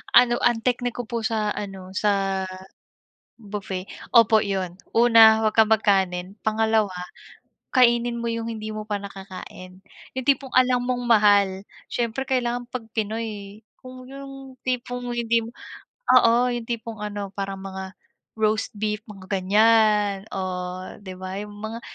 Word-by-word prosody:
Ano 240 0 +6
ang 240 -2 +2
technique 245 -1 0
ko 245 - -3
po 235 0 -3
sa 220 -1 0
ano, 190 -2 -7
sa 195 -1 +1 0.9
buffet, 200 -4 -6 0.3
opo 225 -2 +6
'yon. 190 -3 -3 0.2
Una, 225 -1 +7
huwag 215 - +2
kang 220 -1 +6
magkanin. 195 -3 +1
Pangalawa, 220 -2 +2 0.8
kainin 240 -2 +4
mo 235 - -2
yung 230 0 -3
hindi 215 -1 -5
mo 215 0 -5
pa 205 -1 -1
nakakain, 190 -2 -10 0.4
yung 260 - -3
tipong 275 -2 +1
alam 250 -1 +4
mong 245 -1 -1
mahal. 205 -4 +5 0.4
Siyempre 235 +2 -1
kailangan 245 -1 -1
pag 245 -2 -5
Pinoy 215 -2 -4 0.2
kung 255 0 -11
yung 270 -1 -10
tipong 245 -1 -3
hindi 235 -1 +1
mo - - -8 0.7
oo 240 0 +5
yung 240 -1 -4
tipong 230 -2 -5
ano, 205 -1 -4
parang 195 -1 -4
mga 190 0 -7 0.4
roast 220 0 0
beef 210 0 -1
mga 195 -3 -11
gan'yan, 210 +1 +4 0.2
oh, 185 -1 -4
di 190 -2 -7
ba 185 +1 -6
yung 210 0 -9
mga 225 +2 -5
220 Hz, 140 wpm, -24 LUFS, 200-240 Hz, 0.9 s, Una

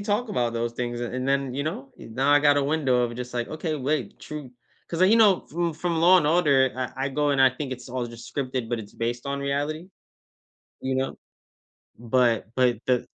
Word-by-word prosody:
talk 210 +3 -1
about 120 - 0
those 115 0 -2
things, 120 0 -4
and 120 +1 -4
and 130 +1 -2
then, 135 -2 0
you 140 - -1
know, 135 -3 -5
now 130 +5 -1
I 145 - +7
got 145 -1 +4
a 145 - +3
window 140 -5 +2
of 120 -1 -2
just 125 0 -7
like, 120 0 -2
"Okay, 155 0 -3
wait, 135 -4 -2
true" 150 -4 -8 0.4
‘cause, 170 +1 -1
uh, - - +8
you 215 +4 +5
know, 210 -5 +5
from 170 +1 -1
from 170 +1 -2
Law& 180 +1 +6
Order, 145 -6 +3
I 130 +1 -3
I - - -1
go 145 +2 0
and 140 -1 +1
I 130 - +7
think 130 +1 -5
it's 125 0 -8
all 125 -1 -3
just 115 0 -11
scripted, 130 -4 -2
but 120 -1 -1
it's 105 -2 -10
based 120 +3 -3
on 140 0 -2
reality, 145 +5 -2 0.9
you 130 0 -1
know? 130 0 -2 0.8
But 120 -2 +1
but 125 -2 +3
the 125 -2 +1
135 Hz, 220 wpm, -25 LUFS, 125-150 Hz, 0.9 s, uh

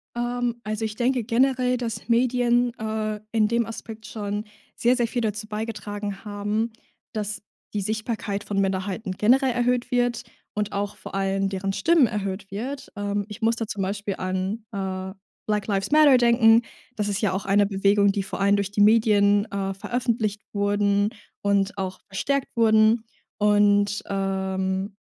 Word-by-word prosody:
Ähm, 240 0 -1
also, 215 +1 -3
ich 215 - -4
denke 245 +1 +1
generell, 250 +2 +2
dass 230 -3 -5
Medien, 245 0 +2
äh, 215 -1 -2
in 220 -2 +3
dem 235 +1 +1
Aspekt 225 0 -8
schon 205 -1 -4 0.3
sehr, 245 +2 +3
sehr 240 -2 +1
viel 240 +1 -2
dazu 215 -1 -2
beigetragen 210 -2 -5
haben, 210 +2 -2 0.4
dass 210 -1 -3 0.3
die 205 - -1
Sichtbarkeit 215 -1 -3
von 200 -1 -2
Minderheiten 195 +1 -1
generell 255 +7 +3
erhöht 245 +1 0
wird 245 -1 +1 0.3
und 210 0 -2
auch 205 +1 -3
vor - - -9
allem 195 0 0
deren 195 0 -2
Stimmen 320 +5 +4
erhöht 195 -2 -4
wird. 260 +8 -5
Ähm, 205 0 -1
ich 210 +3 -9
muss 230 +1 +3
da 230 - -3
zum 200 - -4
Beispiel 200 +1 -3
an, 190 +4 -3
äh, 190 -1 -4 0.3
Black 210 -1 0
Lives 195 +4 -1
Matter 300 -4 +7
denken. 235 -1 +5 0.4
Das 210 - -1
ist 205 0 -1
ja 210 -4 +2
auch 190 +2 -3
eine 200 +1 +4
Bewegung, 200 0 +3
die 195 -1 -2
vor - - -6
allem 200 +1 +4
durch 200 -1 -2
die 205 0 +1
Medien, 205 -2 +5
äh, 195 -1 -2
veröffentlicht 220 -1 -1
wurden 205 0 +2 0.3
und 200 -1 +1
auch 190 -1 -4
verstärkt 275 +8 -1
wurden. 220 0 +4 0.3
Und, 205 -1 +3
ähm, 190 0 -2
210 Hz, 160 wpm, -24 LUFS, 200-230 Hz, 0.4 s, Matter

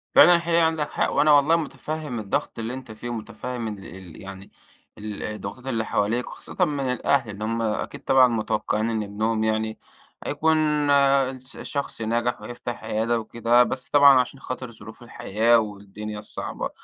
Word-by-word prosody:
فعلًا 175 -1 +8
حقيقي 170 0 +2
عندك 160 -2 +1
حق، - - 0
وأنا 150 +1 +4
والله 145 +3 +5
متفهّم 155 -5 -4
الضغط 115 +4 -3
اللي 115 +2 -3
أنت 130 -3 -8
فيه، 115 +3 -7
ومتفهّم 120 +1 -5
ال 100 -2 -7
ال 90 -2 -11
يعني 95 0 -10 0.5
ال 105 -1 -6
الضغوط 110 +4 -6
اللي 115 -3 -1
حواليك 110 +4 0
وخاصةً - - -2
من 140 -3 -1
الأهل، 130 -3 +1
اللي 105 +2 -7
هم 115 +1 -1
أكيد 110 -2 -3
طبعًا 130 -1 +6
متوقعين 110 -1 -1
إن 110 -2 -1
ابنهم 110 +2 -1
يعني 110 0 -1 0.4
هيكون 155 +2 +1 0.3
ال 135 -2 +3 0.2
شخص 140 -5 -4
ناجح، 120 +2 -1
وهيفتح 120 0 -7
عيادة 115 +2 0
وكده. 115 +2 +3
بس 130 +1 -4
طبعًا 140 -2 +7
عشان 130 +2 -2
خاطر 125 -2 -6
ظروف 110 +2 -12
الحياة، 115 +1 +2
والدنيا 105 0 -6
الصعبة، - - -5
115 Hz, 160 wpm, -24 LUFS, 110-135 Hz, 0.5 s, فعلًا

